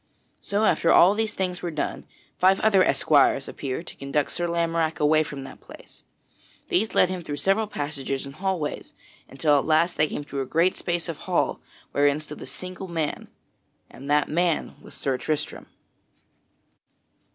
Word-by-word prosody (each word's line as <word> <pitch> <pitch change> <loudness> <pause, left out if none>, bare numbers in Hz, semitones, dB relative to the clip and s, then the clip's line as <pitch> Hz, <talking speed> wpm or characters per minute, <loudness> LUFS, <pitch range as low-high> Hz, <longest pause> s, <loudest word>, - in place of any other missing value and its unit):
So 205 +2 -1
after 170 - +2
all 185 +3 +7
these 215 0 -2
things 180 -1 -2
were 175 - -3
done, 155 -3 -4 0.3
five 190 +1 +4
other 200 -4 +5
esquires 140 -5 +3
appeared 140 +4 -5
to - - -9
conduct 140 +1 -1
Sir 175 0 -2
Lamorack 165 -1 0
away 155 +1 +4
from 140 -3 -5
that - - -11
place. - - -15 0.7
These 215 +5 +1
led 180 - +5
him 185 -1 -4
through 150 -3 -5
several 195 +9 +1
passages 145 -6 -4
and 140 - -9
hallways 185 -3 -3 0.4
until 145 +1 +2
at - - -3
last 165 +2 +2
they 155 - +3
came 145 - -5
to 140 -1 -4
a - - -2
great 170 +6 +2
space 175 -1 -2
of 165 -3 -4
hall - - +1 0.3
wherein 145 +1 +2
stood 150 -1 -9
a - - -7
single 185 +1 -7
man; 165 -4 -3 0.6
and 140 +2 -10
that 150 0 +3
man 170 0 0
was - - -12
Sir 135 -3 -2
Tristram. 150 +1 -3
160 Hz, 170 wpm, -25 LUFS, 145-180 Hz, 0.7 s, all